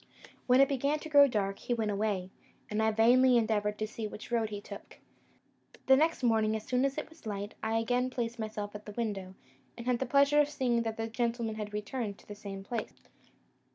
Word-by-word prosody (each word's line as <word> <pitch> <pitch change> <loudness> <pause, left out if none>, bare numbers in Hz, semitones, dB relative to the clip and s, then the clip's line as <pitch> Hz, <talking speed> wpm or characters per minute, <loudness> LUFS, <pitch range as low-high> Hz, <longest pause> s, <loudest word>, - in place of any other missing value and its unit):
When 250 +1 +5
it 275 - +6
began 280 +2 0
to 315 +1 -9
grow 285 -2 +7
dark, 200 -5 -1
he 240 - -1
went 220 -2 -1
away, 200 -3 -1 0.4
and 210 +1 0
I 220 - +3
vainly 245 +3 +5
endeavoured 210 -2 0
to 215 - -2
see 220 0 -5
which 210 +3 -10
road 230 -2 +1
he 205 -1 -5
took. - - -11 0.9
The 265 - +7
next 315 0 +1
morning, 220 -2 +3
as 215 - -4
soon 250 +3 +1
as 275 +1 -1
it 305 - -3
was 320 -6 -14
light, 205 0 -4
I 220 +1 0
again 245 +3 +1
placed 235 -2 -3
myself 215 -2 -4
at 210 +1 -9
the 210 - -7
window, 200 -5 -4 0.4
and 235 - -7
had 250 -1 +1
the 265 - -2
pleasure 280 +3 +5
of 295 - 0
seeing 255 -5 0
that 225 -1 -3
the 225 - -2
gentleman 230 0 -2
had 210 -1 -5
returned 210 0 -4
to - - -20
the 205 - -7
same 195 -1 -8
place. 225 +3 -6
225 Hz, 220 wpm, -31 LUFS, 210-255 Hz, 0.9 s, grow